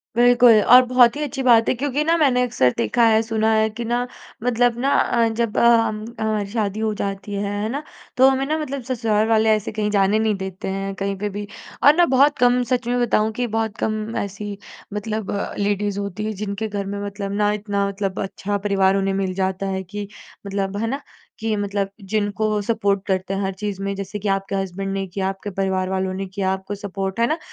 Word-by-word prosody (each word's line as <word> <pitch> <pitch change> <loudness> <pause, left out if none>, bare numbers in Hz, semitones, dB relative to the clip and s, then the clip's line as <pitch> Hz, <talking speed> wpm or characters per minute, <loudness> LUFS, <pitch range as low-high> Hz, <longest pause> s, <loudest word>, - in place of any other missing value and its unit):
बिल्कुल 240 -2 +6
और 250 +1 +8
बहुत 245 -1 +5
ही 295 - -4
अच्छी 280 -1 -4
बात 230 -3 +5
है - - +3
क्योंकि 285 +3 -1
ना 330 +2 +3
मैंने 270 -6 +3
अक्सर 225 - +2
देखा 240 - +1
है, 220 0 +4
सुना 220 0 +1
है 220 0 +3
कि 225 +2 -6
ना 240 +2 -1 0.4
मतलब 245 -1 +2
ना 270 +3 +1
अ, 235 -1 +2
जब 225 -1 -2
अ, - - +4 0.2
हम 215 -1 -2 0.2
हमारी 215 -2 0
शादी 215 -2 -1
हो 220 -1 0
जाती 200 0 -4
है, 200 0 -2 0.2
है 215 - -2
ना? 280 +5 -3 0.3
तो 260 +1 +7
हमें 270 0 0
ना 310 +3 0
मतलब 280 -3 -4
ससुराल 225 -4 0
वाले 220 -1 +3
ऐसे 215 -1 -4
कहीं 210 -1 -1
जाने 200 +1 +3
नहीं 220 -1 +1
देते 190 -1 -6
हैं 195 +1 -3
कहीं 195 0 -2
पे 205 +2 -2
भी। 205 +1 -6 0.4
और 290 +2 +7
ना 350 +1 +5
बहुत 285 +3 +4
कम 245 0 +4
सच 245 0 -1
में 245 +1 +1
बताऊँ 220 -2 +2
कि 245 +2 -2
बहुत 220 -1 -2
कम 215 +1 -2
ऐसी 200 +1 -6 0.4
मतलब 215 0 -3
अ, 200 - -3
लेडीज़ 205 0 -1
होती 200 +1 -4
हैं 215 - -2
जिनके 205 +2 -3
घर 205 -1 -4
में 200 +1 -4
मतलब 200 0 -5
ना, 205 +1 +1
इतना 200 -1 -1
मतलब 195 -1 -3
अच्छा 200 +1 -3
परिवार 195 -1 +2
उन्हें 195 0 0
मिल 195 -1 -1
जाता 190 +1 -1
है 190 0 -2
कि 205 +2 -6 0.4
मतलब, 195 0 -2
है 225 +2 -1
ना? 275 +5 -3 0.4
कि 220 -1 -1
मतलब 200 -1 -2
जिनको 210 +1 -1
सपोर्ट 205 -2 0
करते 190 0 -1
हैं 195 - -2
हर 195 -1 -1
चीज़ 195 0 -5
में, 200 0 -2
जैसे 195 +1 -5
कि 205 - -4
आपके 195 0 -1
हज़्बन्ड 195 0 -3
ने 195 0 -2
किया, 190 +1 -3
आपके 195 +1 -6
परिवार 190 -1 -1
वालों 190 0 -1
ने 195 +1 -4
किया 190 0 -1
आपको 190 +1 -4
सपोर्ट। 195 0 -4
है 235 - +3
ना? 310 - 0
210 Hz, 220 wpm, -21 LUFS, 195-230 Hz, 0.4 s, और